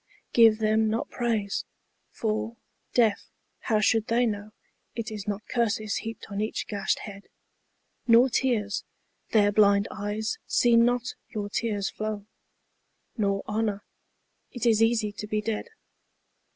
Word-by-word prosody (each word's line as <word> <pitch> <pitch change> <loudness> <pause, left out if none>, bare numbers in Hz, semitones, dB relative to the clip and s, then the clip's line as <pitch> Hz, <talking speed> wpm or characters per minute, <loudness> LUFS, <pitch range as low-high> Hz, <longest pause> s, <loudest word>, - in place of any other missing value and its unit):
Give 225 -2 +7
them 220 0 +2
not 225 +2 -2
praise. 220 -5 -1 0.5
For, 220 +1 -2 0.4
deaf, 225 -4 +2 0.3
how 220 -3 +1
should 220 +1 +2
they 240 +2 +3
know 210 -1 -3 0.4
It 230 -1 -4
is 210 -1 -6
not 205 +1 -4
curses 220 -3 0
heaped 225 0 -6
on 200 +1 -2
each 215 - -2
gashed 200 -2 -1
head? 200 -1 -9 0.8
Nor 235 +2 +7
tears. 225 -5 0 0.5
Their 205 -2 +4
blind 200 -1 +4
eyes 210 - -3
see 240 -1 +4
not 245 +2 +3 0.2
your 205 -2 -4
tears 205 -3 -1
flow. 215 -1 -4 0.9
Nor 200 -3 0
honour. 210 -1 -1 0.7
It 245 -1 -4
is 225 -2 +4
easy 225 -2 +2
to 210 +1 -7
be 215 0 0
dead. 215 - -3
215 Hz, 135 wpm, -27 LUFS, 205-230 Hz, 0.9 s, Give